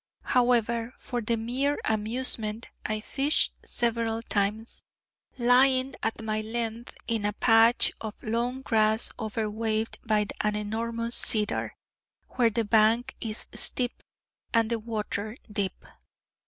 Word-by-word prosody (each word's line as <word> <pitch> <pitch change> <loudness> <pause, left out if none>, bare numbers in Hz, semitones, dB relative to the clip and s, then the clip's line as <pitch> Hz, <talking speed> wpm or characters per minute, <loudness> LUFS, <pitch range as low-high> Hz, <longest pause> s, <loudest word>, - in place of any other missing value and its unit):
However, 235 -1 +1
for 245 -2 -4
the 230 +1 -1
mere 260 +6 -1
amusement, 220 0 0
I 215 0 -2
fished 280 +6 +1
several 230 -1 0
times, 210 +2 -2 0.6
lying 255 +2 +4
at 225 0 -3
my 215 0 -1
length 230 +1 -4
in 225 -2 -1
a 205 0 0
patch 225 +3 +4
of 215 -1 -7
long 240 +4 -2
grass 220 -2 +2
over 220 -1 -2
waved 220 +1 -2
by 210 -1 +1
an 210 0 0
enormous 230 +3 +1
cedar, 210 -2 +3 0.5
where 240 -2 +2
the 225 0 -1
bank 220 +3 +3
is 220 -1 -3
steep, 245 -1 0 0.5
and 230 -1 +2
the 230 - 0
water 215 0 -4
deep. 200 -2 -3
225 Hz, 125 wpm, -27 LUFS, 215-240 Hz, 0.6 s, lying